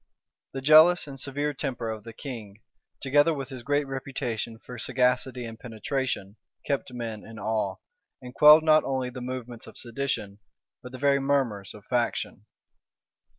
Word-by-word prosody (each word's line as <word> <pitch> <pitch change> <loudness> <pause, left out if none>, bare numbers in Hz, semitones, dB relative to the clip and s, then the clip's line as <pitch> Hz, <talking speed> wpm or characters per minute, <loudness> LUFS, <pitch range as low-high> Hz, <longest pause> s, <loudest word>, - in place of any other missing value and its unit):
The 135 - -4
jealous 155 +5 +7
and 140 -2 -8
severe 145 +3 -1
temper 125 -5 -3
of 110 -1 -7
the 115 - -7
king, 110 -4 -9 0.4
together 145 +4 +4
with 135 -2 -5
his 130 -3 -7
great 145 +3 +1
reputation 130 -4 -4
for 125 +1 -10
sagacity 125 +1 +1
and 115 0 -8
penetration, 120 -3 -3 0.3
kept 140 -2 -2
men 115 -3 -5
in 115 -1 -11
awe, 110 0 -1 0.4
and 125 -1 -10
quelled 150 +2 +8
not 155 -1 +5
only 130 -2 -2
the 125 0 -8
movements 125 -2 -6
of - - -12
sedition, 115 -5 -3 0.4
but 125 - -10
the 130 - -7
very 140 +1 +3
murmurs 135 -9 0
of 105 -1 -14
faction. 120 -3 -2
125 Hz, 155 wpm, -27 LUFS, 115-140 Hz, 0.4 s, quelled